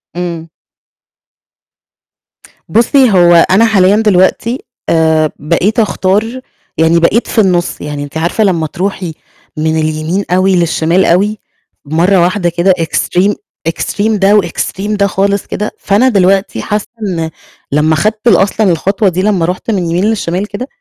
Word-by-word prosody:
إمم. 170 -2 -5 2.2
بُصي 245 +2 +3
هو 175 -3 +5
أنا 205 +5 +4
حاليًا 200 -3 +3
دلوقتي، 215 +3 +1 0.3
آآ، 160 -1 +2
بقيت 175 - 0
أختار 215 +3 0 0.4
يعني 165 +1 +3
بقيت 200 +8 +1
في 225 - +1
النُص، 180 -3 0
يعني 145 -1 -5
أنتِ 145 +2 -7
عارفة 170 +7 0
لما 170 -6 0
تروحي 180 -1 -4 0.4
من 160 +1 0
اليمين 155 +5 -2
أوي 185 +1 +2
للشمال 170 +1 +1
أوي 205 +5 +1 0.5
مرّة 170 +6 +2
واحدة 180 0 +1
كده 175 +2 +2
extreme، 180 +4 0 0.4
extreme 205 +6 -2
ده 200 +2 +4
وextreme 195 +2 -4
ده 200 0 +2
خالص 200 0 -1
كده، 210 +1 -4
فأنا 215 +6 +2
دلوقتي 195 -2 +1
حاسة 210 0 -2 0.2
إن 170 -6 -3 0.4
لما 155 +2 +2
خدت 215 +6 -1
أصلًا 200 -1 +3
الخطوة 195 +4 0
دي 180 +1 -2
لما 195 -4 +1
رُحت 185 +6 -3
من 205 - 0
اليمين 170 +3 0
للشمال 205 -3 -1
كده 210 +5 -6
185 Hz, 140 wpm, -12 LUFS, 170-205 Hz, 2.2 s, هو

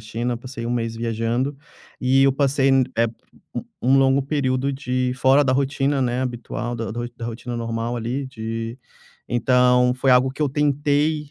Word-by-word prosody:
China, 115 +3 -3
passei 120 -1 -8
um 120 - -2
mês 115 -2 -1
viajando, 115 +4 -1 0.5
e 135 +1 +4
eu 135 0 +5
passei 135 0 +2 0.3
eh, 115 0 +3 0.5
um - - -3 0.2
um 135 +2 +4
longo 135 +1 +3
período 135 -1 0
de 125 -2 -1
fora 135 +3 +4
da 130 - +2
rotina, 135 +1 0
né, 125 -1 0
habitual 120 -1 -4
da 115 -1 -4
da 120 +2 -4
ro 120 - -4
da 115 - -5
rotina 120 +1 -6
normal, 115 +1 -3
ali, 120 +4 -3
de 115 -1 -5 0.5
então, 125 0 +3
foi 130 +1 +1
algo 125 +1 +5
que 145 +3 -4
eu 145 - +2
tentei, 145 +1 +1
125 Hz, 175 wpm, -22 LUFS, 120-135 Hz, 0.5 s, eu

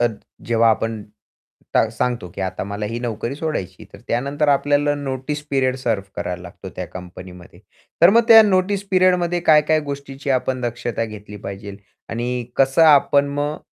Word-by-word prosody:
तर 120 -2 +1 0.4
जेव्हा 115 0 +4
आपण 110 0 -2 0.7
ट - - +4
सांगतो, 120 -4 -2
की - - -6
आता 95 0 -3
मला 100 +1 -4
ही 115 +2 -4
नोकरी 120 +2 -4
सोडायची 150 - -3
आहे, 110 - -10
तर - - -12
त्यानंतर 140 +5 0
आपल्याला 145 +1 +2
नोटीस 140 +1 -4
पिरियड 130 -2 +1
सर्व्ह 115 -7 -2
करावा 90 - -3
लागतो, 90 -1 -10
त्या - - -4
कंपनीमध्ये. 90 -1 -11 0.4
तर 170 - +9
मग 230 +3 +5
त्या 225 -1 +10
नोटीस 200 0 +1
पिरियडमध्ये 180 -2 +2
काय-काय 155 0 +4
गोष्टीची 140 0 -6
आपण 130 0 0
दक्षता 120 -2 -3
घेतली 105 -1 -9
पाहिजे 100 0 -8 0.3
आणि 120 +1 -3
कसं 135 +4 +3
आपण 145 -2 +5
मग 145 +1 -2
130 Hz, 160 wpm, -20 LUFS, 110-145 Hz, 0.7 s, त्या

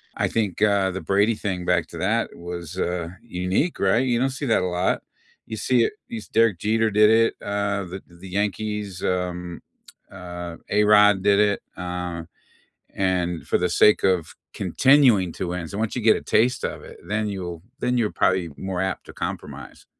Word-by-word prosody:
I - - 0
think, 105 -5 -2
uh, 100 -2 +3
the 95 - -5
Brady 100 +3 +2
thing, 95 -4 -3
back 85 -2 +1
to 85 - -10
that, 110 +7 0
was, 85 0 -7
uh, 90 -2 -1 0.2
unique, 95 - -1
right? 110 +7 +3
You 120 -2 +1
don't 130 +2 +2
see 135 +2 -5
that 115 - +2
a 90 - -1
lot. 90 - +1 0.5
You 110 - -5
see 120 +2 +2
it - - -3
you 230 -3 -6
se - - -15
Derek 110 -6 +3
Jeter 110 +1 +1
did 105 +1 +5
it, 115 +1 +4
uh, 100 0 -1
the 95 +2 -8
the 85 +2 -13
Yankees, 105 0 -3
um, 90 -1 -2 0.5
uh, 90 -2 -7
A-Rod 105 -1 +5
did 100 0 +4
it, 105 -1 +2 0.2
um, 90 -2 -4 0.7
and 90 -3 -1
for - - +2
the 90 - +1
sake 105 +4 +4
of 90 -4 +1 0.2
continuing 125 - +4
to 90 - -4
win, 90 -1 -4
so 100 - -7
once 110 +2 -2
you 120 - -2
get 110 0 +6
a - - -6
taste 125 +3 +2
of - - -4
it, - - -12
then 105 +1 -1
you'll 90 -4 -5 0.2
then 125 0 +1
you're 110 -3 +1
probably 95 -2 +1
more 95 -2 -4
apt 95 - -3
to - - -10
compromise. - - -7
100 Hz, 190 wpm, -23 LUFS, 90-110 Hz, 0.7 s, get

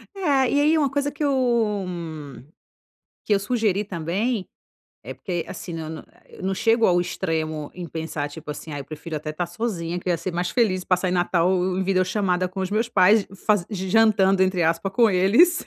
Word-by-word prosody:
É, 390 - -7
ah, 265 -3 +3
e 285 - +2
aí 310 +2 +4
uma 285 -3 +2
coisa 285 +1 -1
que 295 +2 -5
eu 235 -7 +1
m 155 -7 -7 0.8
que 210 - +2
eu - - +3
sugeri 210 -2 0
também, 195 +5 -2 0.6
é - - -6
porque 175 -3 -4
assim, 175 -1 -7
na 160 -1 -5
na 160 - -8 0.2
eu - - -13
não 190 +1 -1
chego 225 +3 +3
ao 175 -1 +3
extremo 160 -4 -3
em 175 -1 -6
pensar, 160 -2 -4
tipo 150 0 -9
assim: 150 +1 -7
"Ai, 145 - -4
eu - - -7
prefiro 155 +2 -8
até 155 +1 -4
estar 170 +3 -3
sozinha 175 -3 -3
que 180 - -6
eu - - +2
ia - - +1
ser 185 +2 -5
mais 175 0 -1
feliz, 190 -7 +1
passar 180 0 +1
Natal 175 0 +2 0.3
em 190 - 0
video 185 -1 +2
chamada 185 -2 0
com 190 +1 -6
os 190 +1 -2
meus 225 +3 0
pais, 205 0 +4 0.2
faz 205 -5 +3
jantando 195 -1 +3
entre 185 -2 +1
aspa 165 +4 +1
com 230 +3 +4
eles, 220 - +4
185 Hz, 205 wpm, -23 LUFS, 170-215 Hz, 0.8 s, aí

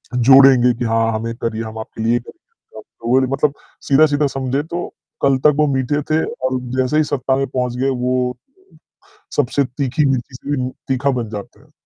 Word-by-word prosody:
जोड़ेंगे 130 0 +6
कि 120 - -1
हाँ 115 0 +1
हें 115 - -6
ये 115 - -3
करिए, 115 0 -2
हम 110 0 -8
आपके 110 0 -7
लिए 120 +2 +2
करेंगे। 450 - -16
तो 115 - -12
वो 130 - +5
रि 130 - +1
मतलब 140 +2 0 0.3
सीधा-सीधा 145 0 +3
समझे 135 +2 -1
तो 170 +2 -5 0.3
कल 135 -1 +3
तक 150 - +8
वो 150 -1 +3
मीठे 135 +3 0
थे 160 +1 +2 0.2
और 130 0 0 0.2
जैसे 130 +4 +1
ही 155 - +4
सत्ता 135 -2 -1
में 135 - -1
पहुँच 125 -2 -2
गए 135 +2 +1 0.2
वो 125 0 +1 1.2
सबसे 140 0 +1
तीखी 135 +3 -1
मिर्ची 130 0 -2
से 140 0 -3
उ 130 - -4 0.2
तीखा 135 +1 +1
बन 115 - -5
जाते 105 -2 -8
हैं। - - -24
130 Hz, 195 wpm, -18 LUFS, 120-145 Hz, 1.2 s, तक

